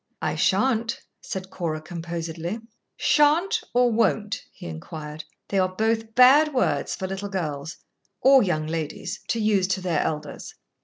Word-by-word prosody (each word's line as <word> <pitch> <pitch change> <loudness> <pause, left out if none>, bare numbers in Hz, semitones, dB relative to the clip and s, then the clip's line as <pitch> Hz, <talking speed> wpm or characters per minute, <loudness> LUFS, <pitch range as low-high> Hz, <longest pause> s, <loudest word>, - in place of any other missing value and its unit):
"I - - -1
shan't," 235 -3 +1 0.2
said 190 0 -6
Cora, 160 -3 -3
composedly. 170 +2 -5 0.4
"Shan't 335 +9 +3
or 245 0 +3
won't?" 220 0 +1
he - - -12
inquired. 150 - -7 0.2
"They 195 - +1
are 185 0 0
both 225 +1 0
bad 280 +4 +6
words 255 - +1
for 190 - -4
little 195 +2 -4
girls 160 -5 -4 0.4
or 270 +3 +7
young 155 -7 0
ladies 165 +5 -4
to 230 - 0
use 210 -4 +2
to 190 0 -1
their 175 -4 0
elders." 150 -2 -4
190 Hz, 145 wpm, -25 LUFS, 165-230 Hz, 0.4 s, or